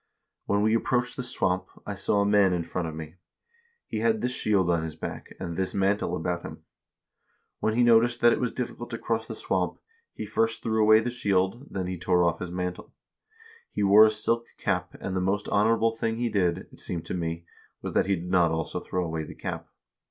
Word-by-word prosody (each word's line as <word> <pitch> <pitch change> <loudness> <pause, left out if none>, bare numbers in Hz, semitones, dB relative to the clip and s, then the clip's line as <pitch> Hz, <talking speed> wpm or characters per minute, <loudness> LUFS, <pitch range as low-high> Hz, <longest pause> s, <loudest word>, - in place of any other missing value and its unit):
When 100 +1 +2
we 110 +1 +3
ap 115 - +2
proached 125 -1 0
the - - -3
swamp, 90 -6 0 0.2
I 100 - -3
saw 100 +1 +1
a - - +2
man 100 -2 +4
in 85 -1 -1
front 85 0 -3
of 80 - -6
me; 80 +2 -8 0.7
he 110 - -4
had 110 0 +2
this 125 - 0
shield 100 -6 +1
on 85 -1 +2
his 80 -1 -5
back, 80 - -7
and 85 -3 -4
this 95 +2 -2
mantle 100 +1 +1
about - - -2
him. - - -9 1.0
When 110 - 0
he 120 - +4
noticed 120 +1 +5
that 120 0 +6
it - - -1
was 125 -2 0
difficult 120 -1 -5
to 115 - -4
cross 115 -1 -2
the - - -6
swamp, - - -1 0.4
he - - -5
first 115 +2 0
threw 110 -1 +1
away 110 +1 +6
the 120 +2 -2
shield, 100 +2 0
then 95 -2 -3
he 90 -1 -4
tore 90 0 +2
off 85 -1 +1
his 90 - -4
mantle 90 0 -4 0.8
He - - -2
wore 100 +2 +8
a - - +5
silk 115 +2 -1
cap, - - -1
and 95 - -4
the 95 - 0
most 100 +3 0
honorable 115 +2 +3
thing 115 0 -1
he 120 0 0
did, 95 -5 +1
it - - -12
seemed 85 -2 -4
to - - -4
me, 85 -1 -3 0.4
was - - -4
that - - +2
he 100 - +3
did 85 -1 -6
not 90 -3 +4
also 80 0 -2
throw 90 -1 -2
away 80 -1 -3
the - - -9
cap. - - -5
100 Hz, 225 wpm, -27 LUFS, 90-115 Hz, 1.0 s, wore